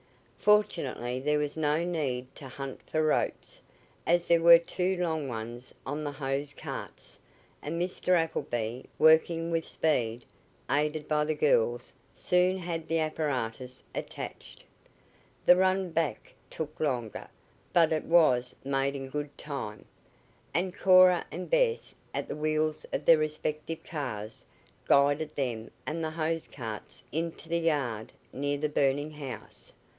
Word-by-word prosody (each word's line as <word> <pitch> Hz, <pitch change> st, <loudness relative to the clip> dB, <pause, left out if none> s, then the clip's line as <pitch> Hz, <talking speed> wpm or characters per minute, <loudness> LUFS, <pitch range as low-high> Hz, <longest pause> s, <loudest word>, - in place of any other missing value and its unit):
Fortunately 140 Hz, -, +2 dB
there 150 Hz, +3 st, +1 dB
was 150 Hz, -1 st, -1 dB
no 155 Hz, +1 st, +1 dB
need 140 Hz, -8 st, -2 dB
to 135 Hz, -, -9 dB
hunt 135 Hz, +1 st, -7 dB
for 155 Hz, 0 st, +1 dB
ropes, 155 Hz, -, -1 dB, 0.5 s
as 175 Hz, 0 st, +3 dB
there 170 Hz, -1 st, +4 dB
were 170 Hz, 0 st, +10 dB
two 180 Hz, +2 st, -1 dB
long 160 Hz, -5 st, -1 dB
ones 120 Hz, +2 st, -7 dB
on 145 Hz, +3 st, -3 dB
the 145 Hz, -1 st, -3 dB
hose 140 Hz, +1 st, -2 dB
carts, -, -, -8 dB, 0.4 s
and 165 Hz, +3 st, -3 dB
Mr. 180 Hz, +1 st, +1 dB
Appleby, 120 Hz, -7 st, -2 dB, 0.2 s
working 165 Hz, +1 st, +4 dB
with 165 Hz, -1 st, +1 dB
speed, 120 Hz, -7 st, 0 dB, 0.5 s
aided 150 Hz, +1 st, 0 dB
by 150 Hz, -1 st, +2 dB
the 155 Hz, +1 st, -1 dB
girls, 120 Hz, -5 st, +2 dB, 0.2 s
soon 180 Hz, +1 st, +2 dB
had 170 Hz, -3 st, -4 dB
the 165 Hz, -, +1 dB
apparatus 130 Hz, -6 st, -2 dB
attached. -, -, -7 dB, 0.8 s
The 180 Hz, -, +8 dB
run 185 Hz, 0 st, +2 dB
back 160 Hz, -2 st, -2 dB, 0.2 s
took 155 Hz, -1 st, -6 dB
longer, 125 Hz, -7 st, -2 dB, 0.4 s
but 165 Hz, -2 st, +4 dB
it 155 Hz, -, -1 dB
was 130 Hz, -8 st, +4 dB
made 135 Hz, 0 st, 0 dB
in 135 Hz, -1 st, -5 dB
good 145 Hz, +1 st, -5 dB
time, 120 Hz, -8 st, -6 dB, 0.7 s
and 180 Hz, +2 st, 0 dB
Cora 185 Hz, -1 st, +6 dB
and -, -, -5 dB
Bess, -, -, +1 dB, 0.2 s
at -, -, -2 dB
the -, -, -4 dB
wheels 155 Hz, 0 st, 0 dB
of 145 Hz, -, -2 dB
their 165 Hz, -2 st, +7 dB
respective 155 Hz, +1 st, -3 dB
cars, 120 Hz, -9 st, -5 dB, 0.4 s
guided 145 Hz, +2 st, +3 dB
them 120 Hz, -5 st, -2 dB, 0.2 s
and 160 Hz, +2 st, -3 dB
the 160 Hz, -, -1 dB
hose 160 Hz, 0 st, -2 dB
carts 115 Hz, -5 st, -7 dB
into 165 Hz, +1 st, -3 dB
the 170 Hz, +1 st, 0 dB
yard 135 Hz, -10 st, -1 dB, 0.2 s
near 145 Hz, +1 st, -1 dB
the 150 Hz, +2 st, 0 dB
burning 145 Hz, +1 st, +1 dB
house. 135 Hz, -7 st, -6 dB
150 Hz, 140 wpm, -29 LUFS, 135-165 Hz, 0.8 s, were